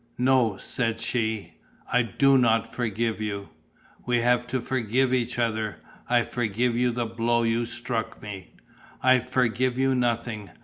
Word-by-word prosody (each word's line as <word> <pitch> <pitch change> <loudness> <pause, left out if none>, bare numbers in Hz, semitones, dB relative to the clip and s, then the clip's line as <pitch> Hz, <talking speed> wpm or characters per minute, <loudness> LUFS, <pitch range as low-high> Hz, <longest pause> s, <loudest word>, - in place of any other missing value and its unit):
"No," 125 -5 +3
said 115 0 -2
she, 110 -2 -2 0.4
"I 125 - +5
do 135 +5 +3
not 115 -3 +2
forgive 115 -1 -1
you." 100 -2 -4 0.5
"We 125 -1 +1
have 120 0 +2
to 130 +2 -1
forgive 125 +1 0
each 120 -1 0
other. 110 -3 -1 0.3
I 120 -1 +4
forgive 120 +1 -1
you 125 +1 +2
the 120 0 -2
blow 120 +1 0
you 115 +1 +1
struck 120 -2 -4
me." 100 -3 -9 0.5
"I 130 0 +6
forgive 125 0 0
you 135 0 +2
nothing. 120 -4 -1
120 Hz, 145 wpm, -26 LUFS, 110-125 Hz, 0.5 s, I